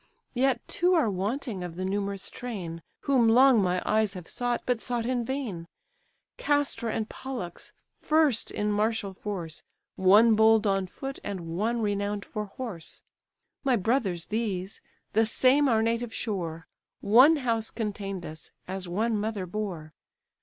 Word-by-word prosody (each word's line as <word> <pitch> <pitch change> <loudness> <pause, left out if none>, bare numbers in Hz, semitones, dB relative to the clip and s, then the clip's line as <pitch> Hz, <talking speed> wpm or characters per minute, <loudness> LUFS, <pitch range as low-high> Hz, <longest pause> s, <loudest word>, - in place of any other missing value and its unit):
Yet 265 +1 +1
two 360 +1 +2
are 290 -11 +3
wanting 205 +1 -2
of 175 -2 -6
the 185 +1 -3
numerous 200 0 -2
train, 180 -9 -6 0.2
Whom 255 -5 +3
long 250 0 +6
my 180 -1 0
eyes 215 -2 +1
have 180 -3 -8
sought, 245 -1 -1
but 245 -3 0
sought 240 +1 -2
in 245 -1 0
vain: 230 -10 -4 0.7
Castor 290 -5 +1
and 220 0 -2
Pollux, 240 -12 -7 0.2
first 305 -7 +2
in 210 0 -1
martial 210 -1 0
force, 180 -5 -6 0.4
One 210 +5 +6
bold 220 0 +5
on 195 -2 +1
foot, 270 +8 -7
and 170 -5 -5
one 225 +4 0
renown'd 205 0 -1
for 210 0 -4
horse. 200 -6 -8 0.6
My 265 -3 +3
brothers 200 -5 0
these; 200 -3 -2 0.3
the 225 +1 +3
same 265 +5 +4
our 220 -2 +3
native 230 0 -1
shore, 170 -7 -3 0.4
One 255 +10 +7
house 230 -6 -1
contain'd 195 -4 -4
us, 155 +1 -8 0.2
as 185 0 -4
one 215 +5 0
mother 210 -2 -2
bore. 175 -5 -5
215 Hz, 145 wpm, -27 LUFS, 190-240 Hz, 0.7 s, One